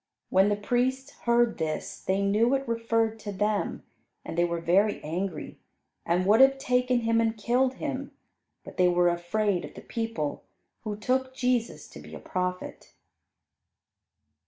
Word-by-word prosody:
When 190 Hz, +2 st, +5 dB
the 205 Hz, -, +2 dB
priests 255 Hz, +6 st, -1 dB, 0.2 s
heard 235 Hz, -3 st, +3 dB
this 155 Hz, -1 st, -3 dB
they 195 Hz, +1 st, 0 dB
knew 220 Hz, +6 st, +3 dB
it 275 Hz, -1 st, -3 dB
referred 230 Hz, -1 st, 0 dB
to 210 Hz, -1 st, -6 dB
them, 205 Hz, +1 st, -1 dB, 0.4 s
and -, -, -6 dB
they 170 Hz, -, +3 dB
were 170 Hz, 0 st, -2 dB
very 195 Hz, +5 st, +2 dB
angry 175 Hz, +4 st, -4 dB, 0.5 s
and 180 Hz, +2 st, +1 dB
would 215 Hz, +5 st, +5 dB
have 270 Hz, 0 st, +6 dB
taken 250 Hz, -1 st, +1 dB
Him 230 Hz, 0 st, +2 dB
and 225 Hz, 0 st, 0 dB
killed 250 Hz, +4 st, +1 dB
Him, 280 Hz, -1 st, -4 dB, 0.5 s
but -, -, -12 dB
they 180 Hz, -, +5 dB
were 175 Hz, 0 st, +3 dB
afraid 175 Hz, +2 st, 0 dB
of -, -, -9 dB
the -, -, -9 dB
people, 225 Hz, -11 st, -3 dB, 0.4 s
who 210 Hz, -2 st, -4 dB
took 260 Hz, +4 st, -1 dB
Jesus 250 Hz, -3 st, -1 dB
to -, -, -11 dB
be -, -, -11 dB
a -, -, -8 dB
prophet. 180 Hz, 0 st, -4 dB
220 Hz, 155 wpm, -27 LUFS, 185-245 Hz, 0.5 s, have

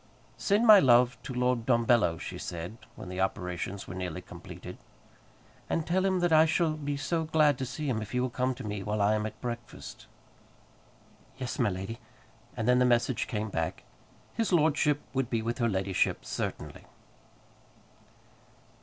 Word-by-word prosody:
"Send 210 Hz, +3 st, +2 dB
my 215 Hz, -3 st, +10 dB
love 125 Hz, -3 st, +5 dB
to -, -, -7 dB
Lord 125 Hz, -2 st, 0 dB
Dumbello," 120 Hz, -8 st, +3 dB
she -, -, -6 dB
said, 85 Hz, +4 st, -6 dB, 0.2 s
when -, -, -9 dB
the 90 Hz, +1 st, -4 dB
operations 95 Hz, 0 st, -3 dB
were -, -, -6 dB
nearly 90 Hz, -3 st, -4 dB
completed, -, -, -10 dB, 0.9 s
"and 165 Hz, -, 0 dB
tell 185 Hz, +3 st, +1 dB
him 190 Hz, -2 st, +1 dB
that 175 Hz, -2 st, +2 dB
I 160 Hz, +1 st, +7 dB
shall 160 Hz, 0 st, +2 dB
be 145 Hz, -2 st, -3 dB
so 160 Hz, +3 st, -1 dB
glad 155 Hz, -2 st, +3 dB
to 130 Hz, -, -2 dB
see 150 Hz, +4 st, -4 dB
him 115 Hz, -5 st, 0 dB
if 105 Hz, -, -6 dB
he 125 Hz, -, -1 dB
will 125 Hz, 0 st, -1 dB
come 130 Hz, 0 st, 0 dB
to 130 Hz, -, -8 dB
me 105 Hz, -2 st, -4 dB
while 105 Hz, +2 st, -2 dB
I 100 Hz, +1 st, +3 dB
am 110 Hz, 0 st, 0 dB
at 110 Hz, -, -10 dB
breakfast." 120 Hz, -1 st, -7 dB, 1.3 s
"Yes, 130 Hz, -2 st, -5 dB
my 120 Hz, -4 st, +3 dB
lady." 95 Hz, +5 st, -5 dB, 0.6 s
And 110 Hz, -1 st, -2 dB
then 125 Hz, 0 st, +5 dB
the -, -, +5 dB
message 120 Hz, -1 st, +2 dB
came 110 Hz, 0 st, -3 dB
back: 80 Hz, -3 st, -3 dB, 0.5 s
"His 225 Hz, -3 st, -1 dB
lordship 150 Hz, -3 st, +3 dB
would 135 Hz, -2 st, -1 dB
be 115 Hz, -3 st, -1 dB
with 120 Hz, +3 st, -3 dB
her 115 Hz, -1 st, +2 dB
ladyship 95 Hz, -2 st, 0 dB
certainly." -, -, -5 dB
120 Hz, 170 wpm, -29 LUFS, 105-145 Hz, 1.3 s, my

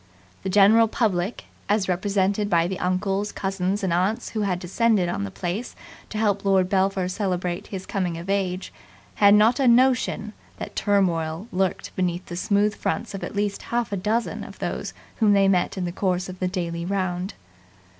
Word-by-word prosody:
The -, -, -3 dB
general 210 Hz, +4 st, +6 dB
public, 205 Hz, -3 st, -1 dB, 0.2 s
as 205 Hz, -2 st, +2 dB
represented 200 Hz, +2 st, 0 dB
by 170 Hz, -3 st, +3 dB
the 185 Hz, +1 st, -3 dB
uncles, 195 Hz, +3 st, -1 dB
cousins, 195 Hz, +1 st, -2 dB
and 185 Hz, -3 st, +1 dB
aunts 185 Hz, +6 st, 0 dB
who 220 Hz, -, -3 dB
had 195 Hz, -3 st, 0 dB
descended 195 Hz, +2 st, +1 dB
on 100 Hz, -, -2 dB
the -, -, -5 dB
place 180 Hz, -, -4 dB, 0.3 s
to 215 Hz, -, -5 dB
help 205 Hz, -2 st, +1 dB
Lord 190 Hz, -2 st, +3 dB
Belpher 190 Hz, -1 st, +1 dB
celebrate 180 Hz, -2 st, -2 dB
his 190 Hz, -2 st, -6 dB
coming 180 Hz, -4 st, -2 dB
of 170 Hz, +2 st, -8 dB
age, 190 Hz, -2 st, -1 dB, 0.5 s
had 200 Hz, 0 st, +8 dB
not 225 Hz, +5 st, +4 dB
a 270 Hz, -, +3 dB
notion 240 Hz, -3 st, +3 dB, 0.2 s
that -, -, -7 dB
turmoil 175 Hz, -3 st, 0 dB
lurked 185 Hz, -1 st, -1 dB
behind 180 Hz, -1 st, -1 dB
the 175 Hz, -, -7 dB
smooth 205 Hz, +3 st, +1 dB
fronts 225 Hz, 0 st, -3 dB
of 195 Hz, -, -6 dB
at -, -, -5 dB
least 205 Hz, 0 st, -1 dB
half 235 Hz, -2 st, -1 dB
a -, -, 0 dB
dozen 215 Hz, +5 st, -1 dB
of -, -, -10 dB
those -, -, -4 dB, 0.2 s
whom 215 Hz, -3 st, +4 dB
they 195 Hz, -1 st, +4 dB
met 185 Hz, 0 st, +1 dB
in 185 Hz, -, -1 dB
the 175 Hz, -, -3 dB
course 180 Hz, 0 st, -1 dB
of 185 Hz, 0 st, -9 dB
the 185 Hz, -, 0 dB
daily 170 Hz, -2 st, -3 dB
round. 185 Hz, 0 st, -2 dB
195 Hz, 185 wpm, -24 LUFS, 180-210 Hz, 0.5 s, had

